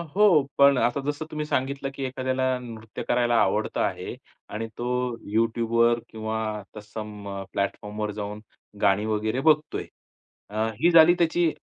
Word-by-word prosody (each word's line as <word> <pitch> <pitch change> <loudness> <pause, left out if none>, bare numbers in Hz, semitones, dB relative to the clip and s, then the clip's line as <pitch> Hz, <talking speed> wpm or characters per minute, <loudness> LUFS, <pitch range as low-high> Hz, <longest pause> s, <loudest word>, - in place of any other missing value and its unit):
हो, 200 -7 +6 0.2
पण 140 -1 +6
आता 125 +3 +1
जसं 145 +2 -3
तुम्ही 150 0 -3
सांगितलं, 140 -1 -1
की 135 - -4
एखाद्याला 130 0 -2 0.2
नृत्य 115 -3 -8
करायला 120 -1 +2
आवडतं 105 +3 0
आहे - - -2 0.4
आणि 115 +1 -3
तो 120 - -4 0.5
YouTubeवर 115 +1 +2
किंवा 110 0 -4 0.4
तर 105 - -6
सम 105 -1 -8 0.2
प्लॅटफॉर्मवर 105 +2 -3
जाऊन 105 0 -5 0.4
गाणी 100 +2 +3
वगैरे 110 +3 -1
बघतोय. 150 0 +1 0.6
अ, 110 +2 -1
ही 175 +3 +4
झाली 165 +1 +8
त्याची 170 0 +2
115 Hz, 140 wpm, -25 LUFS, 110-140 Hz, 0.6 s, झाली